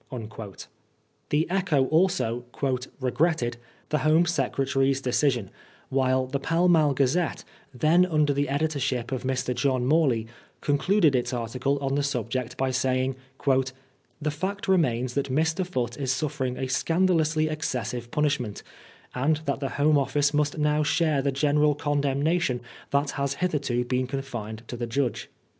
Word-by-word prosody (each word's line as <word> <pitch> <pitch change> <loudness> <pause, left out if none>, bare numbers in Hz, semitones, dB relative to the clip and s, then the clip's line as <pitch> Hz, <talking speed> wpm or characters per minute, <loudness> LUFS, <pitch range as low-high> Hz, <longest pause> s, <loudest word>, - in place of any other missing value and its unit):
The 150 +2 +1
Echo 180 -7 +1
also 140 -9 +1 0.3
" 125 +2 -6
regretted 130 -2 0 0.2
" - - -33
the 150 - +1
Home 155 +3 +4
Secretary's 135 -3 +1
de 130 -2 -2
cision, 125 -8 +1 0.4
while 130 -1 +2
the 135 +2 -3
Pall 165 +5 +1
Mall 155 -5 +4
Gazette, 140 +6 +1 0.3
then 155 +8 +3
under 155 -4 +2
the 140 +1 0
editorship 140 -4 -1
of 130 - -2
Mr. 130 -1 -1
John 125 0 0
Morley, 135 -6 +2 0.3
concluded 155 +3 +2
its 125 0 0
article 125 +4 -1
on 135 -1 -1
the 145 - +1
subject 125 -2 -2
by 130 0 0
saying, 130 +1 0
" 135 - -22 0.7
The 150 -1 -1
fact 190 +7 -4
remains 130 -10 +2
that 140 -1 -1
Mr. 160 +6 +1
Foote 125 -10 -3
is 135 -2 0
suffering 135 -2 -2
a 130 - -2
scandalously 160 +2 +2
excessive 125 -6 -3
punishment, 140 -7 -1 0.5
and 145 +5 +1
that 140 - -1
the 135 -1 -2
Home 145 +1 +4
Office 145 +1 +1
must 150 0 +1
now 150 0 +2
share 155 -1 +2
the 140 +1 0
general 150 +1 +2
condemnation 145 0 0 0.3
that 140 0 +1
has 140 0 -2
hitherto 140 -8 -1
been 125 +1 0
confined 120 -5 -5
to 120 - -6
the 120 0 -4
judge." 125 +1 -2
140 Hz, 150 wpm, -26 LUFS, 130-155 Hz, 0.7 s, Home